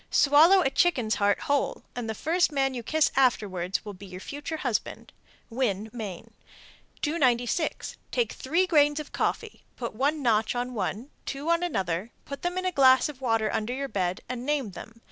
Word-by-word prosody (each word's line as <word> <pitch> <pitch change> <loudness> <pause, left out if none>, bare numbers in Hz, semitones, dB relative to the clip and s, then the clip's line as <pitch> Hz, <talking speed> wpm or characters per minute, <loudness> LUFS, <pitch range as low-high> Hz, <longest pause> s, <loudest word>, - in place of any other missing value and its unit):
Swallow 315 +7 +6
a 270 - +1
chicken's 265 -7 +2
heart 200 0 +2
whole, 285 -1 0
and 240 -2 -4
the 220 - -2
first 335 - +1
man 270 -2 +1
you 245 - -4
kiss 310 +6 +2
afterwards 205 -8 +1
will 205 - -6
be 195 +1 -11
your 185 0 -9
future 290 - -6
husband. 245 -8 -3 0.4
Winn, 220 -4 -1
Me. 210 -7 -6 0.8
296. 280 -1 0
Take 480 -2 0
three 335 +8 +1
grains 295 -4 +3
of 300 - -7
coffee, 450 -2 -2
put 235 -2 -5
one 280 +6 0
notch 220 -1 +2
on 245 +1 -2
one, 220 +5 -3 0.2
two 285 +4 -2
on 335 0 +2
another, 195 - -2 0.2
put 280 - -7
them 355 +1 -2
in 370 - -2
a 370 - +1
glass 260 -3 +5
of 270 -3 -10
water 225 -4 +1
under 225 +4 -1
your 275 +1 -3
bed, 185 -4 -2
and 245 0 -5
name 280 -6 -1
them. 225 +5 -11
260 Hz, 185 wpm, -27 LUFS, 220-295 Hz, 0.8 s, Swallow